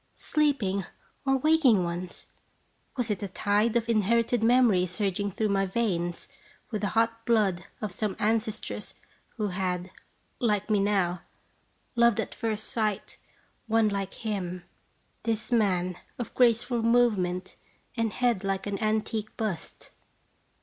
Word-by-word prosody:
sleeping 260 -11 +1 0.4
or 270 0 +4
waking 265 - +4
ones? 175 +1 -5 0.7
Was 240 -4 0
it 200 - -2
a 200 - -2
tide 205 +4 +1
of 235 -1 +1
inherited 230 +2 +2
memories 225 -6 +4
surging 200 +1 -1
through 215 +3 -1
my 195 -1 +1
veins 180 -5 -1 0.4
with 215 - -2
the 205 - +1
hot 230 0 +2
blood 205 -7 +1 0.2
of 210 - -2
some 205 +1 -2
ancestress 220 0 -1 0.4
who 210 -2 0
had, 180 -1 -2 0.5
like 210 -3 0
me 210 - +4
now, 190 -4 +1 0.7
loved 235 -2 +4
at - - -2
first 220 -2 -2
sight 215 -3 -2 0.5
one 225 -1 +3
like 195 -1 -3
him, 185 -5 -4 0.6
this 220 0 -2
man 185 -6 +2 0.2
of 240 - -5
graceful 240 0 +3
movement 210 -6 +2 0.4
and 230 -3 0
head 240 -5 +1
like 195 -1 -1
an 200 0 -3
antique 215 0 -1
bust? 210 -7 -4
215 Hz, 130 wpm, -28 LUFS, 190-230 Hz, 0.7 s, or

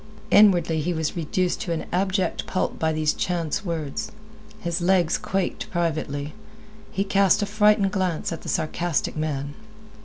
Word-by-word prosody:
Inwardly 175 -6 +5
he 175 +4 -1
was 160 -2 -2
reduced 175 +2 -1
to 175 - -3
an 160 - -3
abject 190 +1 0
pulp 185 - -1
by 160 0 +1
these 155 -1 +1
chance 170 -1 -2
words. 170 +5 -3 0.5
His 170 -4 -2
legs 175 -2 +3
quaked 190 -1 -2
privately. 155 -4 -2 0.6
He 195 - 0
cast 195 0 +3
a - - +1
frightened 210 -1 +3
glance 185 -6 -1
at 165 - -7
the - - -7
sarcastic 165 0 -1
man. 145 -2 -3
175 Hz, 150 wpm, -24 LUFS, 160-190 Hz, 0.6 s, Inwardly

